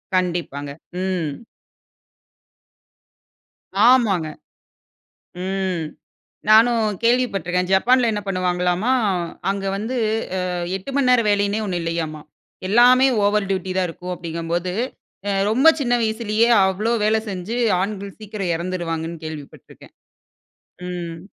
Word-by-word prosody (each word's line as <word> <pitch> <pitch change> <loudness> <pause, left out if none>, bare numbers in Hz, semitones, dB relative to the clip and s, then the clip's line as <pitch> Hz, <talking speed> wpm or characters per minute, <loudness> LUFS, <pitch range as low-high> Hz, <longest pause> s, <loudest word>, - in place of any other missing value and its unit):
கண்டிப்பாங்க. 170 -6 -1 0.3
ம். 175 -6 -2 2.5
ஆமாங்க. 215 -10 +4 1.2
ம் 190 -3 -2 0.6
நானும் 225 +1 +5 0.2
கேள்விப்பட்டு 235 -7 +1
இருக்கேன். 180 0 0
ஜப்பான்ல 245 +5 +4
என்ன 210 -1 -2
பண்ணுவாங்களாம்மா, 180 +4 0 0.6
அங்க 195 0 -2
வந்து 225 +5 -3 0.4
அ - - -1 0.4
8 195 +8 -8
மணி 275 -3 +2
நேரம் 240 -3 +4
வேலையின்னே 205 +1 +1
ஒன்னு 180 -3 -2
இல்லையாம்மா. 165 -2 -3 0.5
எல்லாமே 250 +4 +6 0.2
ஓவர் 205 0 +2
டியூட்டி 190 -1 -2
தான் 185 -1 +1
இருக்கும் 180 +2 -6
அப்படிங்கும்போது, 170 +1 -3 0.5
அ - - +1 0.2
ரொம்ப 260 +8 +4
சின்ன 245 -3 +1
வயசுலயே 220 0 +1 0.2
அவ்ளோ 205 +5 0
வேல 215 +1 +3
செஞ்சு 195 +4 -4 0.2
ஆண்கள் 200 0 -5
சீக்கிரம் 200 -4 -3
எறந்துருவாங்கன்னு 170 -2 -4
கேள்விப்பட்டு 155 -3 -9
இருக்கேன். - - -17 1.0
ம். 170 -2 -5
190 Hz, 105 wpm, -21 LUFS, 175-220 Hz, 2.5 s, எல்லாமே